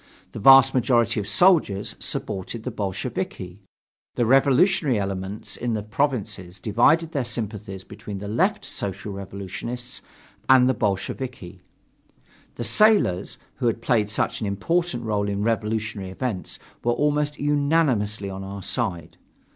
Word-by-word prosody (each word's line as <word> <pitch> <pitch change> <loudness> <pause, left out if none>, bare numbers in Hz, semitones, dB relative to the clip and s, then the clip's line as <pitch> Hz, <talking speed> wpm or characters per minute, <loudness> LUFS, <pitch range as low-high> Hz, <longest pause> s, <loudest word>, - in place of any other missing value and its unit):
The - - -7
vast 135 +3 +8
majority 120 -4 +2
of 100 - -4
soldiers 150 - +3
supported 100 +4 -4
the 125 - -4
Bolsheviki. 95 -2 -4 0.6
The 120 - +1
revolutionary 135 - +3
element 95 +1 -4
in 120 -1 -2
the 105 - -3
provinces 105 -7 -2
divided 155 - +3
their 140 -5 -1
sympathies 105 -5 -5
between 105 0 -8
the 100 +1 -6
Left 190 - 0
Social 100 +1 -4
Revolutionists 100 +6 -6 0.5
and 130 -1 +7
the 130 - +3
Bolsheviki. 100 -2 -3 0.9
The 120 - -4
sailors, 120 - +3 0.2
who 120 - 0
had 115 - 0
played 110 -4 +2
such 105 - -1
an 105 - -1
important 120 - -1
role 105 -2 -1
in 100 0 -2
revolutionary 110 -3 -2
events, 100 -1 -4 0.3
were 120 - +2
almost 150 +2 0
unanimously 140 -9 +1
on 95 0 -6
our 100 0 -7
side. 90 -11 -2
110 Hz, 130 wpm, -24 LUFS, 100-130 Hz, 0.9 s, vast